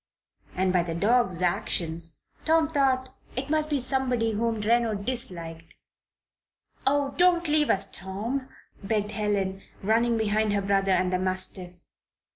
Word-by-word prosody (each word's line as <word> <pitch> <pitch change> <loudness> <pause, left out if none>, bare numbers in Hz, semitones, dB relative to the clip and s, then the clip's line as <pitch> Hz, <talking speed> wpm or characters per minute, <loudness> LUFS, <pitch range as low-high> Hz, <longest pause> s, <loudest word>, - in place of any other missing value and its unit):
And 185 0 +1
by 180 - +4
the 170 -1 -4
dog's 200 -2 +2
actions 170 -2 -1 0.2
Tom 320 -1 +2
thought 260 -2 +1 0.2
it 270 +3 -3
must 310 -1 +1
be 290 -2 +1
somebody 250 -3 0
whom 225 +2 0
Reno 225 +1 +2
disliked. 180 -8 -6 1.1
"Oh, 280 0 +2
don't 350 -1 +4
leave 300 0 +2
us, 195 0 +5
Tom!" 225 +8 -3 0.3
begged 210 +1 -1
Helen, 200 -3 -1 0.2
running 230 +3 +2
behind 215 -1 +1
her 200 - +1
brother 195 0 +1
and 185 0 +2
the 180 - +1
mastiff. 185 -1 -1
215 Hz, 135 wpm, -26 LUFS, 190-260 Hz, 1.1 s, us